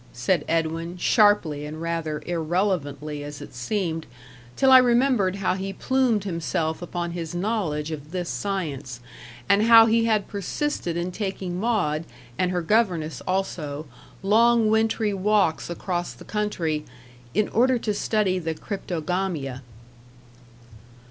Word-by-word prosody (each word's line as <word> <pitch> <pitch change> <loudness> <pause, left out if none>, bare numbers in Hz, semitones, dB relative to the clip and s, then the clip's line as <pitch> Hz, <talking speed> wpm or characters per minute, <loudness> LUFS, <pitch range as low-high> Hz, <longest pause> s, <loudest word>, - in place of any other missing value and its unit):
said 125 +10 +1
Edwin, 165 +2 -1
sharply 195 - +3
and 150 +1 -6
rather 165 -2 -3
irrelevantly 160 -4 -1
as 145 -1 -7
it 145 - -10
seemed, 165 - -2 0.5
till 265 -1 +4
I 260 - +10
remembered 240 -6 +3
how 195 -2 0
he 195 +1 -4
plumed 255 -5 +1
himself 160 -3 -2
upon 175 0 -4
his 170 -1 -5
knowledge 175 -6 -1
of 150 -1 -7
this 175 0 -3
science, 150 -13 -3 0.5
and 200 0 +4
how 225 0 +8
he 225 0 +3
had 215 -3 +1
persisted 200 - -2
in 175 +1 -2
taking 190 -2 -4
Maud, 185 -9 0 0.3
and 180 +5 +1
her 180 -1 -1
governess 170 - +1
also, 160 -6 -2 0.4
long 225 +2 +4
wintry 220 -1 +1
walks 195 -4 +1
across 175 0 -3
the - - -14
country, 175 -8 -1 0.5
"in 215 +1 +2
order 250 +3 +3
to 220 -2 -2
study 205 -2 +1
the 160 -2 -3
cryptogamia." 170 -7 -3
180 Hz, 130 wpm, -24 LUFS, 160-210 Hz, 0.5 s, I